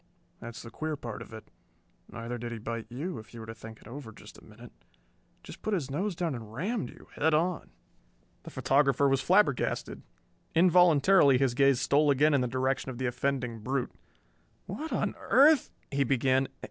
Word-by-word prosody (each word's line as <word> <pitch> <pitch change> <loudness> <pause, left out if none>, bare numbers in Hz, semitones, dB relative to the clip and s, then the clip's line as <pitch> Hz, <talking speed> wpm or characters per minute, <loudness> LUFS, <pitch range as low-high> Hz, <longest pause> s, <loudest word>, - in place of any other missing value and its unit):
That's 115 0 -9
the 115 - -10
queer 155 +5 -3
part 120 -6 -7
of - - -11
it. 110 -1 -11 0.6
Neither 120 +1 -6
did 120 0 -5
he 115 - -5
bite 115 +1 -5
you, 145 +6 -5
if 110 +2 -14
you - - -8
were 110 - -8
to 115 - -7
think 110 0 -11
it - - -15
over 120 -1 -8
a - - -15
minute. - - -14 0.7
Just - - -11
put 215 - -1
his 140 -7 -3
nose 185 +6 -2
down 165 -3 -2
and 110 -4 -8
rammed 195 - -3
you, - - -15
head 160 +1 +2
on." 170 +3 -1 0.7
The - - -10
photographer 140 0 +2
was 135 -1 +2
flabbergasted. 160 - +1 0.5
Involuntarily 170 -3 +5
his 135 -2 +1
gaze 135 0 +3
stole 145 +2 +3
again 145 +2 +4
in 140 - +3
the 125 - 0
direction 130 +2 -1
of 125 - -6
the 130 - -3
offending 125 -2 -2
brute. 130 +4 -2 0.7
"What 315 +1 -6
on - - -1
earth 290 0 +4
" - - -38
he 140 0 +1
began. 130 +1 +2
135 Hz, 185 wpm, -29 LUFS, 120-155 Hz, 0.7 s, Involuntarily